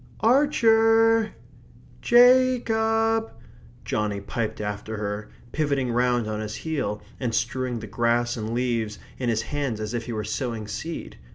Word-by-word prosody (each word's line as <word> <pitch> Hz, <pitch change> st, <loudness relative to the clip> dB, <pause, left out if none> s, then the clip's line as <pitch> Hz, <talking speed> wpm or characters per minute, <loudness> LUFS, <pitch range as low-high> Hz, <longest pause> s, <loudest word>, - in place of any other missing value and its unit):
"Ar 275 Hz, +6 st, +4 dB
cher! 225 Hz, -2 st, +4 dB, 0.7 s
Ja 255 Hz, +1 st, +6 dB
cob!" 225 Hz, 0 st, +1 dB, 0.5 s
Johnny 105 Hz, -1 st, -1 dB
piped 110 Hz, +2 st, -4 dB
after 105 Hz, +1 st, -4 dB
her, 105 Hz, 0 st, -4 dB, 0.2 s
pivoting 140 Hz, -5 st, 0 dB
round 120 Hz, -1 st, +1 dB
on 105 Hz, 0 st, -3 dB
his 110 Hz, 0 st, -5 dB
heel, 140 Hz, -11 st, -3 dB, 0.2 s
and 120 Hz, -4 st, -1 dB
strewing 125 Hz, +2 st, -1 dB
the -, -, -6 dB
grass 120 Hz, +3 st, 0 dB
and 110 Hz, -1 st, -4 dB
leaves 115 Hz, -3 st, -1 dB, 0.2 s
in 125 Hz, -2 st, -1 dB
his 110 Hz, -1 st, 0 dB
hands 140 Hz, -5 st, -3 dB
as 110 Hz, +1 st, -4 dB
if 115 Hz, -1 st, -3 dB
he 120 Hz, -, -4 dB
were 110 Hz, -1 st, -3 dB
sowing 110 Hz, 0 st, -3 dB
seed. 160 Hz, +11 st, -6 dB
120 Hz, 150 wpm, -25 LUFS, -, 0.7 s, Ja